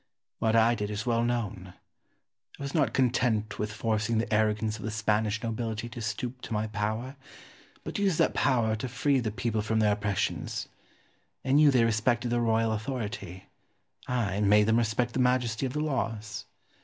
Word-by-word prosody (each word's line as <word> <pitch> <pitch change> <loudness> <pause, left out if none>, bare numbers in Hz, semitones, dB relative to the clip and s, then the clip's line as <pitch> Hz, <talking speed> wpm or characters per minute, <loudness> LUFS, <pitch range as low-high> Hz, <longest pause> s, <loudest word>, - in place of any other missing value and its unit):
What 110 0 +2
I 115 +1 +5
did 105 -3 -3
is 105 +1 -4
well 115 -1 +2
known. 105 -7 -3 0.8
I - - -5
was 140 - -4
not 145 -8 +2
content 120 -4 +1
with 105 0 -2
forcing 110 +1 0
the 110 0 -1
arrogance 110 0 +1
of - - -8
the 110 - -2
Spanish 110 0 0
nobility 115 0 -3
to 120 - -8
stoop 120 +4 -4
to - - -6
my 105 0 0
power, 110 +5 -3 0.7
but - - -4
used 195 -5 +2
that - - +3
power 115 -5 +2
to 125 +4 -4
free 135 +3 +1
the 115 -3 -1
people 110 +1 -1
from 110 +1 -1
their 105 -1 +3
oppressions. 105 -1 -2 0.8
In 135 +2 +3
you 150 -1 +7
they 125 -4 +4
respected 120 +2 +1
the 120 0 +1
royal 115 -1 +2
authority; 105 -5 -4 0.6
I 110 -6 -1
made 105 +1 +5
them 110 +2 +3
respect 120 +1 0
the - - -1
majesty 125 -1 +1
of 125 - -6
the 150 - -1
laws. 110 -8 -3
110 Hz, 180 wpm, -28 LUFS, 105-120 Hz, 0.8 s, you